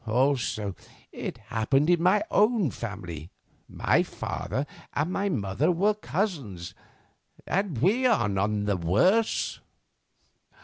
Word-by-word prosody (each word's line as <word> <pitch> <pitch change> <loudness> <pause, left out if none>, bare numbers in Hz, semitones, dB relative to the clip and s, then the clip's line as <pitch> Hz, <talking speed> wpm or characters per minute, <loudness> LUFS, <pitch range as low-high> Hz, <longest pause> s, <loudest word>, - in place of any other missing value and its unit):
Also, 120 -4 +1 0.4
it - - -5
happened 135 +6 +1
in 175 -1 +3
my 190 +4 +4
own 210 - +3
family, 90 -8 -6 0.4
my - - +2
father 135 - -3 0.3
and 180 - 0
mother 100 - +1
were 200 +5 +2
cousins, 145 - -3 0.7
and 190 -7 -1
we 210 - +3
are 220 - +3
none 100 +1 0
the 100 -2 +1
worse." 180 - +2
140 Hz, 105 wpm, -27 LUFS, -, 0.7 s, my